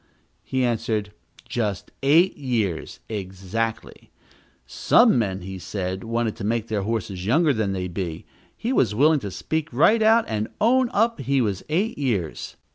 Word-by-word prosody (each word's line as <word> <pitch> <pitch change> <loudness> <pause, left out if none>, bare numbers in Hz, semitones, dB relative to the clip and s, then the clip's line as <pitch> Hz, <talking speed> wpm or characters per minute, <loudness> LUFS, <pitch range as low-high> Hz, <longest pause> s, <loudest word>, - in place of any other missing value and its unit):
He 130 -1 -1
answered, 110 -3 -1 0.4
just 105 -6 -3
eight 160 +7 +4
years, 115 - -2
exactly 100 +2 -4 0.6
some 65 - +4
men, 95 -4 -1
he 95 +1 -7
said, 95 +1 -4
wanted 115 -1 -1
to - - -7
make 115 +1 -1
their 105 -2 -1
horses 95 -3 -3
younger 150 +5 +3
than 110 -4 -1
they 90 -1 -3
be; 85 -2 -5 0.3
he 240 +4 -2
was 115 - +2
willing 150 +5 +4
to 105 - -5
speak 160 - -3
right 210 - +4
out, 225 +1 +5
and 110 0 -2
own 250 +3 +3
up 230 +2 +1
he 135 +1 +1
was 100 -6 0
eight 195 +7 0
years. 105 - -2
115 Hz, 155 wpm, -24 LUFS, 95-145 Hz, 0.6 s, out